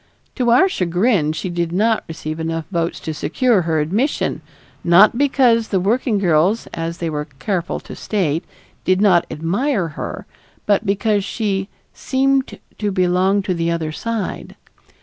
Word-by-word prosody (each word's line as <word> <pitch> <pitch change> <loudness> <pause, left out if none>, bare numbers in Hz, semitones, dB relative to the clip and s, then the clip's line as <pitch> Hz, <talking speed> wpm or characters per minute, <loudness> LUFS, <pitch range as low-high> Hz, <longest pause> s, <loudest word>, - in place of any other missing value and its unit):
To 245 -2 0
our 250 +11 +6
chagrin, 180 - +1
she 175 +3 -4
did 170 -1 -2
not 215 +5 +1
receive 155 -1 -6
enough 165 0 -3
votes 170 -1 -1
to 160 - -4
secure 200 - +1
her 160 -2 0
admission, 205 - -1 0.4
not 185 +6 +6
because 250 -4 +3
the 190 - 0
working 220 +4 +1
girls, 180 +3 +2
as 165 +1 -4
they 170 - -3
were 150 -2 -3
careful 175 +3 -2
to - - -10
state, 170 -6 -1 0.4
did 185 0 +2
not 190 -5 +4
admire 190 - -1
her, 150 - -6 0.4
but 210 +1 +1
because 205 +1 +1
she 195 -2 -2 0.2
"seemed 270 0 0 0.2
to 210 -1 -1
belong 185 +2 +2
to 185 - -1
the 170 -1 -1
other 165 -2 -2
side." 225 +3 -4
190 Hz, 150 wpm, -19 LUFS, 165-220 Hz, 0.4 s, our